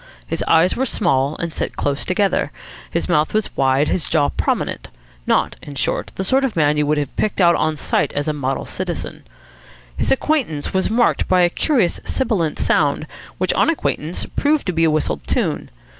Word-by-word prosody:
His - - -3
eyes 165 +3 +4
were 265 +2 0
small 145 - +1
and 170 -2 -4
set - - -3
close 140 0 -1
together. 195 +1 +1 0.4
His - - -2
mouth 150 +6 +1
was 215 -2 -1
wide, 135 +2 +2
his 170 - -1
jaw 145 - +2
prominent. - - -2 0.4
Not, - - +1
in 145 - -9
short, - - -1
the 190 - -2
sort 265 +8 +2
of 265 -5 -1
man 150 -2 +3
you 150 -1 +1
would 150 +1 +2
have 145 -3 -3
picked 215 - -1
out 170 -2 +6
on 155 -2 0
sight - - 0
as 145 +1 -2
a 155 - +1
model 135 -2 -2
citizen. - - -5 0.7
His - - 0
entrance 270 - 0
was 190 0 +1
marked 235 +2 +2
by 185 -1 +4
a 175 -1 +3
curious 235 - +1
sibilant 195 - -1
sound, 145 0 +1 0.3
which, 185 - +1
on - - +3
acquaintance, 175 - -2
proved 295 +1 0
to 185 - -1
be 165 0 +2
a - - +4
whistled 150 - -1
tune. - - -1
165 Hz, 190 wpm, -20 LUFS, 145-205 Hz, 0.7 s, out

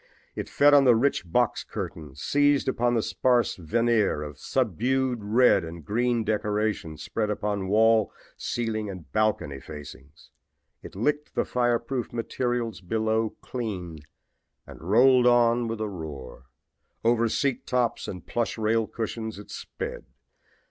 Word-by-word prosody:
It - - -5
fed 145 +1 +5
on 140 -1 +7
the 125 -2 +6
rich 115 -8 0
box 120 +3 +1
curtains, 75 -3 -7
seized 145 -1 +3
upon 120 -2 +1
the 115 - +1
sparse 125 -4 +1
veneer 105 -1 +1
of 75 -2 -9
subdued 130 +2 0
red 105 -2 +4
and 80 -1 -8
green 120 +4 +1
decorations 105 -6 -1
spread 105 -2 -2
upon 100 -2 -2
wall, 110 +1 +4 0.2
ceiling 110 -3 -3
and 90 -5 -9
balcony 110 -10 0
facings. 75 -1 -12 0.5
It - - -11
licked 150 +8 -1
the - - +1
fireproof 120 0 -1
materials 120 -3 -2
below 110 +3 -1
clean 95 -10 -5 0.7
and - - -12
rolled 125 +7 +5
on 120 -1 +4
with 115 -1 -4
a 110 - -1
roar. 70 -9 -8 0.6
Over 115 0 +3
seat 135 +1 -1
tops 125 -2 0
and 90 -4 -7
plush 120 -1 -2
rail 110 0 +1
cushions 110 -1 -5
it 105 - -11
sped. - - -6
110 Hz, 135 wpm, -26 LUFS, 95-120 Hz, 0.7 s, on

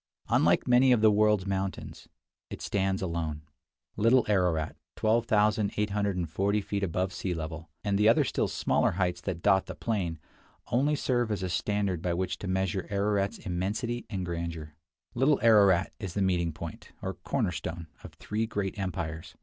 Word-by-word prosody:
Unlike - - +3
many 125 +1 +5
of 115 - +2
the 110 -1 +6
world's 105 -2 +3
mountains, 95 -1 -4 0.4
it - - -7
stands 95 -1 -1
alone. 80 -4 -3 0.5
Little 115 +3 +4
Ararat 90 -6 +1 0.2
(12,840 105 -4 +1
feet 100 0 -3
above 95 +1 -1
sea 90 0 -3
level), 80 0 -6
and 100 -1 0
the 105 +1 +6
other 115 - +5
still - - 0
smaller - - +1
heights 90 -1 -1
that 90 -4 -4
dot 95 -2 +3
the - - -6
plain, 95 -8 -2 0.5
only 140 +5 +2
serve 120 -5 0
as 100 -3 -2
a 90 - -2
standard 100 -1 -1
by 85 -1 -1
which 95 +1 -2
to 100 - -5
measure 95 0 -1
Ararat's 100 0 0
immensity 105 +7 -2
and 95 -4 -3
grandeur. 85 -3 -5 0.4
Little 135 +4 +3
Ararat 100 -5 +5
is 95 -5 -6
the 100 - +1
meeting 90 -3 +1
point, 80 +1 -9
or - - -2
corner - - -1
stone, 85 0 -5 0.2
of - - -10
three 110 +2 -2
great 100 -2 -3
empires. 85 -4 -4
95 Hz, 160 wpm, -29 LUFS, 85-105 Hz, 0.5 s, the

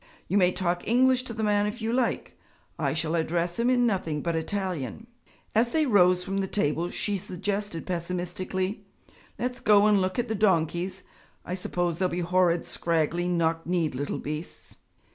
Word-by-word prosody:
You 190 - -1
may 180 -1 +4
talk 175 -1 -2
English 255 +3 +4
to 230 - -5
the 220 - -2
man 205 -1 +2
if 210 +4 -5
you 225 +1 -2
like; 250 -1 -1 0.4
I - - 0
shall 160 0 -1
address 170 +3 0
him 235 +1 +3
in 245 -1 +3
nothing 165 -9 -1
but 170 -1 -1
Italian.' 185 - -3 0.5
As 235 +2 +2
they 315 -1 +3
rose 180 -6 +4
from 195 +1 -2
the 195 - -1
table 170 -3 0
she 205 +2 -1
suggested 195 -1 -3
pessimistically, 180 +2 -3 0.5
'Let's 250 0 -3
go 210 -3 +5
and 210 -2 +4
look 185 +3 -1
at 245 0 0
the 220 - -1
donkeys 185 -2 +1 0.4
I 180 - -4
suppose 175 -2 -2
they'll 185 -1 +2
be 175 +1 -2
horrid, 175 -1 +2
scraggly, 170 +1 0
knock 165 -2 0
kneed 170 -4 0
little 140 +3 -3
beasts.' 155 +3 -6
185 Hz, 175 wpm, -27 LUFS, 170-210 Hz, 0.5 s, go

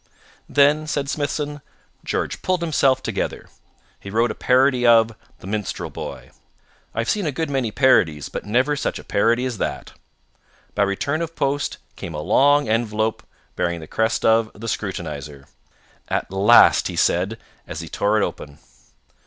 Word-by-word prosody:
"Then," 145 +2 +3
said 145 -2 -2
Smithson, 145 0 -3 0.4
"George - - -3
pulled 185 -1 0
himself 140 -5 +2
together. - - -3 0.5
He 100 - -9
wrote 115 +3 +1
a - - -3
parody 130 0 +3
of 115 -1 +5 0.3
'The - - -14
Minstrel 105 0 -4
Boy.' - - -8 0.6
I 115 - +1
have 115 - -3
seen 205 -6 -1
a - - 0
good 160 +2 -3
many 130 -4 0
parodies, 90 - +3
but - - -6
never 125 +7 +1
such 140 - -2
a - - -10
parody 115 +5 +1
as 120 -6 -4
that. - - -4 0.8
By 105 - -1
return 100 +11 0
of 165 0 -4
post 140 +1 -1 0.2
came 80 - -7
a - - -3
long 145 - +3
envelope 110 -1 0 0.3
bearing 85 -1 -1
the 80 - -9
crest 110 +7 -1
of 110 0 +4
the 115 +2 -8
Scrutinizer. 75 -10 -5 0.6
'At - - -2
last,' 100 +5 +6
he - - -5
said, 95 +6 +1 0.3
as 80 - -6
he 85 - -8
tore 105 +5 +1
it - - +2
open. 70 -1 -8
115 Hz, 160 wpm, -22 LUFS, 100-140 Hz, 0.8 s, last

